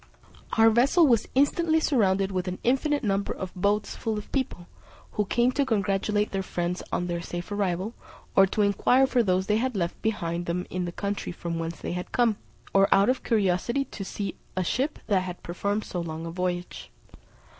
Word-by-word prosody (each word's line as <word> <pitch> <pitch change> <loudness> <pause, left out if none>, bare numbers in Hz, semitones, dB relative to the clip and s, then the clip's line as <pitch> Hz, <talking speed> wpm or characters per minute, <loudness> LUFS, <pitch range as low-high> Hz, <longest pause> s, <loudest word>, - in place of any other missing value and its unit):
Our 225 0 +7
vessel 275 +9 +5
was 235 -6 +3
instantly 315 +4 +3
surrounded 195 -10 +2
with 185 -1 -2
an 180 0 -3
infinite 285 +4 +1
number 200 -2 0
of 185 -1 -6
boats 205 +3 0
full 220 -1 -2
of 210 - -8
people, 260 -10 -2 0.5
who 210 - 0
came 240 +5 +2
to 280 +2 +1
congratulate 205 -2 0
their 195 - -1
friends 180 -1 -2
on 175 - 0
their 170 -1 -2
safe 175 +2 -6
arrival, 200 +1 -1 0.4
or 195 0 +7
to 210 +2 +1
inquire 245 +6 +4
for 255 -2 +2
those 190 -3 +1
they 210 +1 +2
had 255 +1 -1
left 170 -3 -2
behind 175 -5 -2
them 180 +1 -1
in 180 0 -2
the 175 - -4
country 200 +3 -3
from 170 -1 -4
whence 165 0 -4
they - - -4
had 180 0 -5
come, 235 -4 +2 0.4
or 195 0 +4
out 200 +4 +5
of 255 - +1
curiosity 220 +5 +1
to 210 - -7
see 200 +1 -4 0.2
a 185 - +2
ship 265 - -1
that 200 -4 +2
had 180 -1 -7
performed 200 +5 -2
so 175 - -4
long 165 -1 -5
a 165 - -5
voyage. 180 0 -3
200 Hz, 195 wpm, -27 LUFS, 180-230 Hz, 0.5 s, Our